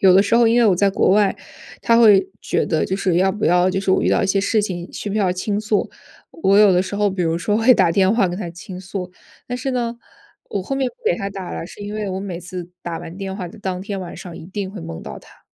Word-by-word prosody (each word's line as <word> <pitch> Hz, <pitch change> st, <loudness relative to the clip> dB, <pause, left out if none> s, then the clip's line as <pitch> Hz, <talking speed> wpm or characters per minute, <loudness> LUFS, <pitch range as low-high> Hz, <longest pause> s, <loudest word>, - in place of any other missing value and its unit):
有 190 Hz, -2 st, +6 dB
的 195 Hz, -, +6 dB
时 205 Hz, +3 st, 0 dB
候 235 Hz, -1 st, +5 dB
因 230 Hz, +2 st, +4 dB
为 235 Hz, -, +5 dB
我 195 Hz, -, +4 dB
在 200 Hz, +2 st, +3 dB
国 -, -, +2 dB
外， 200 Hz, 0 st, +3 dB, 0.5 s
他 230 Hz, -1 st, +4 dB
会 200 Hz, -5 st, +6 dB
觉 -, -, 0 dB
得 160 Hz, -5 st, +1 dB
就 190 Hz, -, -2 dB
是 185 Hz, -3 st, 0 dB
要 190 Hz, +2 st, +3 dB
不 210 Hz, +2 st, -3 dB
要 180 Hz, +2 st, +4 dB
就 190 Hz, -, -1 dB
是 195 Hz, -1 st, -1 dB
我 -, -, +3 dB
遇 -, -, +2 dB
到 -, -, +2 dB
一 -, -, +1 dB
些 195 Hz, +1 st, +1 dB
事 215 Hz, +2 st, +2 dB
情 175 Hz, -3 st, -4 dB
需 -, -, -5 dB
不 -, -, -3 dB
需 215 Hz, -, +1 dB
要 185 Hz, -3 st, +2 dB
倾 200 Hz, +3 st, -2 dB
诉。 215 Hz, -1 st, 0 dB, 0.4 s
我 200 Hz, -11 st, +2 dB
有 210 Hz, -1 st, +7 dB
的 180 Hz, 0 st, +3 dB
时 185 Hz, +1 st, -6 dB
候 210 Hz, 0 st, +2 dB
比 185 Hz, -1 st, -2 dB
如 165 Hz, 0 st, 0 dB
说 205 Hz, +4 st, 0 dB
会 230 Hz, +3 st, +6 dB
打 170 Hz, -, +3 dB
电 190 Hz, +3 st, +3 dB
话 225 Hz, -5 st, +3 dB
跟 175 Hz, -, -4 dB
他 180 Hz, -, -4 dB
倾 180 Hz, +2 st, -9 dB
诉。 185 Hz, 0 st, -6 dB, 0.4 s
但 245 Hz, -, -3 dB
是 270 Hz, +1 st, -3 dB
呢， 240 Hz, -2 st, -2 dB, 0.5 s
我 195 Hz, -, -2 dB
后 270 Hz, +8 st, -3 dB
面 270 Hz, -1 st, +1 dB
不 -, -, -30 dB, 0.2 s
给 -, -, 0 dB
他 200 Hz, -3 st, -4 dB
打 195 Hz, -2 st, -7 dB
了， -, -, -5 dB
是 195 Hz, -, -13 dB
因 205 Hz, +1 st, -6 dB
为 210 Hz, -2 st, -3 dB
我 190 Hz, +1 st, -3 dB
每 190 Hz, -4 st, -5 dB
次 180 Hz, 0 st, -7 dB
打 170 Hz, -1 st, -4 dB
完 165 Hz, -, -9 dB
电 195 Hz, -1 st, -5 dB
话 185 Hz, -3 st, -5 dB
的 220 Hz, -, -14 dB
当 190 Hz, -3 st, -3 dB
天 200 Hz, +1 st, -5 dB
晚 180 Hz, -2 st, -7 dB
上 175 Hz, -2 st, -9 dB
一 -, -, -10 dB
定 195 Hz, 0 st, -5 dB
会 200 Hz, -3 st, -8 dB
梦 80 Hz, -, -7 dB
到 -, -, -8 dB
他。 -, -, -20 dB
195 Hz, 315 characters per minute, -20 LUFS, 180-210 Hz, 0.5 s, 有